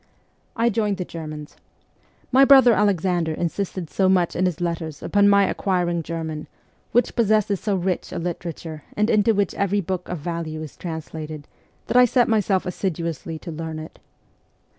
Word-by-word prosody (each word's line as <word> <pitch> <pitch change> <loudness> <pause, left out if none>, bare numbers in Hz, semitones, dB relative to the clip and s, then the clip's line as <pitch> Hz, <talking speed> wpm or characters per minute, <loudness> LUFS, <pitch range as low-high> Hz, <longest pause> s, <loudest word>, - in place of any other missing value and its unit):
I 235 0 +2
joined 210 -2 0
the 180 - -3
Germans. 155 -3 -8 0.7
My 265 +2 +6
brother 265 -3 +7
Alexander 180 -5 +1
insisted 175 +1 -3
so 190 -1 +2
much 180 -2 +2
in 185 +1 +2
his 175 -4 -3
letters 165 -3 -3
upon 205 0 +4
my 200 0 +5
acquiring 175 -3 0
German, 160 -1 -5 0.4
which 245 - +2
possesses 215 -3 +2
so 205 -2 -1
rich 185 -1 -2
a - - -4
literature 165 -2 -5
and 210 +2 +2
into 215 +1 +3
which 200 -2 +1
every 200 +1 0
book 185 -1 -4
of 180 - -3
value 155 0 -4
is 155 - -9
translated, 155 -3 -7 0.4
that 245 - +1
I 250 - +8
set 245 0 +3
myself 205 -4 +1
assiduously 170 -3 -3
to 170 +2 -8
learn 160 0 -5
it. 155 0 -9
180 Hz, 160 wpm, -23 LUFS, 160-205 Hz, 0.7 s, I